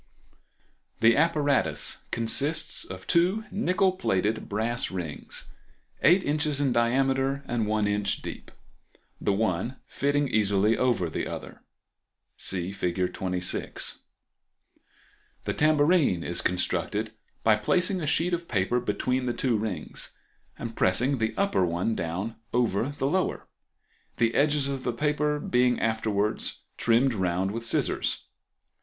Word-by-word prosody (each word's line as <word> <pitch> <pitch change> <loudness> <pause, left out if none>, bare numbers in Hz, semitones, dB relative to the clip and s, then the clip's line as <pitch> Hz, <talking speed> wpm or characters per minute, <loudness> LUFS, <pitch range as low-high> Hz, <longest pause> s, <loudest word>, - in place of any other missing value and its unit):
The 115 0 +6
apparatus 150 -3 +1
consists 145 +8 +2
of 95 0 -9
two 185 +6 +2
nickel 190 -1 +2
plated 110 - -1
brass 115 +4 -1
rings, 85 -6 -6 0.5
8 180 +6 +5
in. 150 +2 0 0.2
in 135 -3 +1
diameter 135 +3 +1
and 115 -4 -1
1 105 0 +1
in. 105 0 0
deep; 100 - -4 0.7
the - - +1
one 105 +3 0
fitting 145 +1 0
easily 105 -1 +2
over 120 -9 +1
the 80 - -3
other - - -8 0.7
(see 90 -1 0
Fig. 90 -1 -1
26). 90 -1 -1 1.4
The - - -2
tambourine 150 - +3
is 85 - -1
constructed 90 +4 -1 0.3
by 110 -1 +5
placing 180 - +1
a 155 - -2
sheet 170 +4 +1
of 170 0 -2
paper 105 +3 +1
between 125 +4 -1
the 120 - 0
two 125 -1 +1
rings, 105 -7 -4 0.4
and 115 -1 -6
pressing 125 +9 +2
the 110 0 -1
upper 200 - +2
one 90 +6 0
down 95 +7 -3 0.2
over 120 0 +1
the 145 -2 -3
lower, 185 +7 0 0.7
the 115 -1 +2
edges 145 -1 +3
of 135 -2 -3
the 120 - -1
paper 150 +3 0
being 125 -3 +2
afterwards 110 -2 -1
trimmed 120 +3 +3
round 95 -1 0
with 115 +2 -4
scissors. 115 - 0
115 Hz, 125 wpm, -27 LUFS, 100-145 Hz, 1.4 s, The